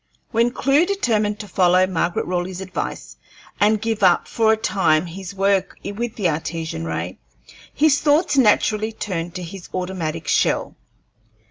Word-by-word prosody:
When 235 +1 +3
Clewe 280 +7 +2
determined 215 - 0
to 210 - -9
follow 185 -1 +3
Margaret 175 -1 -1
Raleigh's 180 +1 -3
advice 190 -1 -5 0.4
and 210 +1 +3
give 225 0 -2
up 185 -3 +4
for 220 -1 +2
a 220 - +3
time 190 -7 +1
his 185 +3 -8
work 195 0 +1
with 225 +3 -4
the 200 -5 0
Artesian 160 - -3
ray, 80 +2 -4 0.5
his 295 -1 +3
thoughts 300 +2 +3
naturally 215 -3 +3
turned 175 -5 -4
to 180 - -5
his 175 +1 -9
automatic 170 -4 -3
shell. - - +1
195 Hz, 145 wpm, -21 LUFS, 175-220 Hz, 0.5 s, up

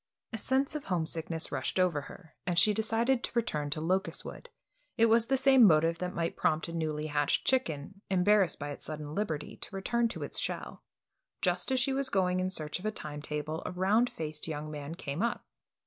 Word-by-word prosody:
A - - -2
sense 265 +6 +1
of 300 -2 -5
homesickness 165 -2 -1
rushed 135 +6 -1
over 175 -5 +2
her, 160 +3 -13
and 175 -2 0
she 210 +4 +6
decided 230 +4 +1
to - - -2
return 155 -12 0
to 150 - -2
Locustwood. 185 +4 -2 0.5
It 230 - +6
was 230 0 +4
the 270 - +2
same 265 -1 +6
motive 165 -3 +5
that 180 0 -3
might 165 0 -1
prompt 155 +1 +1
a 170 - -6
newly 155 -2 -2
hatched 145 -1 +1
chicken, 195 - 0
embarrassed 195 0 +3
by 145 0 -5
its - - -8
sudden 150 -1 -6
liberty, 160 -6 -3
to - - -7
return 235 +5 +1
to - - -6
its - - -3
shell. - - -4 0.6
Just - - +1
as 260 - +3
she 265 +2 +1
was 270 0 +1
going 185 -4 +2
in 185 0 0
search 155 -3 -3
of 205 - -4
a - - +1
time 150 -7 -6
table, 150 +2 -3
a - - -3
round 200 +7 +2
faced 155 -1 -5
young 155 -1 -4
man 145 +1 -6
came 145 -1 -4
up. 235 +1 -1
180 Hz, 205 wpm, -31 LUFS, 155-225 Hz, 0.6 s, she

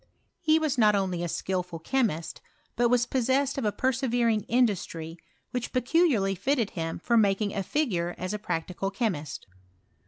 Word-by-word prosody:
He 315 -2 +3
was 305 -5 0
not 210 -2 +5
only 185 -3 -1
a - - -1
skilful 180 -1 -3
chemist, 170 - -1 0.3
but 240 0 +3
was 245 0 +3
possessed 265 +2 +1
of 235 - -2
a 210 - +2
persevering 240 -3 +1
industry 190 -9 0 0.4
which 250 -1 -3
peculiarly 255 - +2
fitted 235 +2 0
him 165 -2 -3
for 235 +6 +1
making 205 -1 +2
a 200 - -1
figure 185 - -1
as 185 +3 -4
a 210 - -3
practical 180 0 -3
chemist. 185 - -3
215 Hz, 155 wpm, -27 LUFS, 180-255 Hz, 0.4 s, not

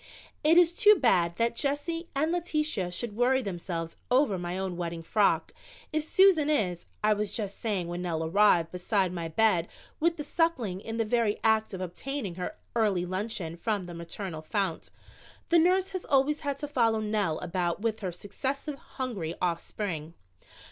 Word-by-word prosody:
"It 320 +3 +5
is 345 -1 +6
too 425 +2 +7
bad 175 - +2
that 230 +3 +1
Jessie 305 +5 -2
and 310 +4 +1
Letitia 305 - -1
should 205 +4 -3
worry 255 +3 +3
themselves 170 -4 -4
over 250 -7 +3
my 175 +1 -3
own 190 -2 -3
wedding 170 -1 -4
frock, 205 +4 +2 0.4
if 310 - +2
Susan 320 -1 +4
is 185 - 0
" - - -38
I 215 0 +5
was 210 -1 -2
just 205 -4 -4
saying 200 -6 -1
when 175 +1 -4
Nell 165 -3 -2
arrived 170 -1 +4
beside 185 0 0
my 170 -2 -3
bed 175 0 +2 0.3
with 335 +1 +2
the 295 - -3
Suckling 285 - 0
in 225 +1 -5
the 225 - +1
very 220 -1 +1
act 220 0 +3
of 185 - -6
obtaining 200 +4 -4
her 180 +1 -5 0.2
early 205 -6 +2
luncheon 185 -2 -3
from 205 +1 -2
the 175 - -8
maternal 170 0 -6
fount. 195 +4 -2 0.6
The 340 - +6
nurse 370 +3 +3
has 370 -2 -4
always 280 +2 +2
had 285 -1 -2
to 295 - -4
follow 230 -6 +2
Nell 210 -7 0
about 175 +1 -2
with 225 -1 -1
her 185 -3 -3
successive 275 - -4 0.2
hungry 200 -11 -3
offspring. 170 -2 -3
210 Hz, 175 wpm, -29 LUFS, 180-275 Hz, 0.6 s, too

